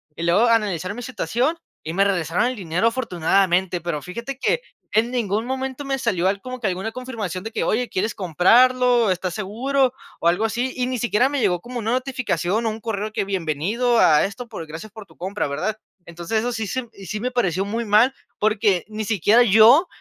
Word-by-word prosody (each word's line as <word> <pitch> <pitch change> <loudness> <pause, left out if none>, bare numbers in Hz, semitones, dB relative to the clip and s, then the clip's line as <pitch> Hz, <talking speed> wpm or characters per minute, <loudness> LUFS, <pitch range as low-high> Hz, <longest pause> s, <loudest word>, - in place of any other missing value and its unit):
Y 165 - -5
luego 200 +8 +4
analizaron 205 -3 0
mi 245 - -6
situación 255 - -1 0.3
y 160 - -5
me 195 +3 +3
regresaron 180 -1 +1
el 255 - -2
dinero 180 +1 0
afortunadamente, 185 -5 +1
pero 165 -3 -3
fíjate 235 - -6
que - - +1 0.3
en 230 +3 +2
ningún 220 -3 -1
momento 265 +2 -4
me 270 -1 -1
salió 185 -8 0
al 195 +1 0
como 255 0 -7
que 230 - -6
alguna 190 +4 -3
confirmación 225 -8 -5
de 225 - -6
que: - - -2
"Oye, 245 +2 0
¿quieres 210 +4 -2
comprarlo?, 235 +6 +4
¿estás 180 -1 -2
seguro?", 250 +6 0 0.3
o 170 - 0
algo 180 +6 +2
así, 240 +4 -2
y 250 -1 -1
ni 255 -1 -2
siquiera 240 +2 +2
me 285 0 -1
llegó 180 -5 +1
como 245 +1 -7
una 225 0 -2
notificación 250 -5 -1
o - - +2
un 220 +1 -8
correo 215 -1 -3
que: 200 - -1
"Bienvenido 195 - 0
a 150 -2 +5
esto, 230 +5 -6
por 185 -7 -7
gracias 160 +7 -9
por 215 -1 -11
tu 160 -4 -21
compra", 190 -1 -3
¿verdad? 205 +10 -2 0.3
Entonces 170 +6 -2
eso 245 +2 -2
sí 225 -1 -3
se 260 - -2
m 240 - -14
y 195 - -12
sí 210 +6 -3
me 250 +4 -1
pareció 195 -6 0
muy 225 +3 -3
mal, 215 +6 +4 0.3
porque 210 -4 +2
ni 215 0 -4
siquiera 215 +3 +4
yo, 235 - +6
215 Hz, 210 wpm, -22 LUFS, 185-245 Hz, 0.3 s, yo